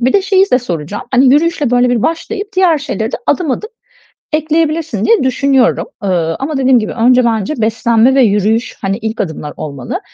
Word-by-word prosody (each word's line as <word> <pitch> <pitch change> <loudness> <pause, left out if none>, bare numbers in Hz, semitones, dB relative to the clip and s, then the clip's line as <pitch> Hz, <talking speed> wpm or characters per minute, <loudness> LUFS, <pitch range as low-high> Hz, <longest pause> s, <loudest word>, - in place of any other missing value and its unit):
Bir 255 +2 +1
de 400 - +3
şeyi 385 0 +3
de 250 - +5
soracağım. 180 - -5
Hani, 260 +1 +4
yürüyüşle 305 -4 +1
böyle 245 0 +2
bir 240 -3 0
başlayıp 400 +6 -3
diğer 350 -5 +3
şeyleri 225 -6 -4
de - - -1
adım 310 0 0
adım 430 - -3 0.6
ekleyebilirsin 310 -6 -1
diye 230 +2 +3
düşünüyorum. 260 0 +1 0.2
Eee, - - -1 0.3
ama 280 +2 -3
dediğim 260 -2 +4
gibi 215 - -3
önce 250 +2 +3
bence 225 +3 -1
beslenme 225 +2 +2
ve 270 - +4
yürüyüş 220 +1 +1
hani 195 0 -1
ilk 220 -1 -5
adımlar 155 -5 -4
olmalı. 140 -5 -6
250 Hz, 185 wpm, -14 LUFS, 220-305 Hz, 0.6 s, de